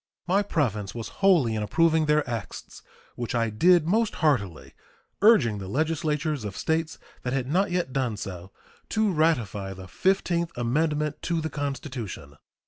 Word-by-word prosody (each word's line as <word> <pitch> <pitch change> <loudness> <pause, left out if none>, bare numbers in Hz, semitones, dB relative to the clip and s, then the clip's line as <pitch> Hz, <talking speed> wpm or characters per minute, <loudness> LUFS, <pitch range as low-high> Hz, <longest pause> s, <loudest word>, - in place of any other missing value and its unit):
My 190 +3 +2
province 115 - -1
was 115 -2 -5
wholly 170 - +4
in 110 - -2
approving 160 +8 +2
their 150 -1 +2
acts, 115 -4 -6 0.3
which 120 0 -4
I 115 -2 +1
did 170 +9 +4
most 220 +5 +1
heartily, 115 - 0 0.5
urging 145 - +5
the 95 - -6
legislatures 150 - -1
of 100 -3 -6
States 160 0 -1 0.2
that 125 - -3
had 135 -2 0
not 185 +9 +1
yet 175 -7 -1
done 125 -6 -1
so 95 -1 -7 0.4
to 220 -2 +1
ratify 110 - 0
the 95 0 -10
fifteenth 170 - 0
amendment 150 +5 0
to 170 -1 -1
the 160 -1 -3
Constitution. 125 - -5
145 Hz, 150 wpm, -26 LUFS, 110-165 Hz, 0.5 s, urging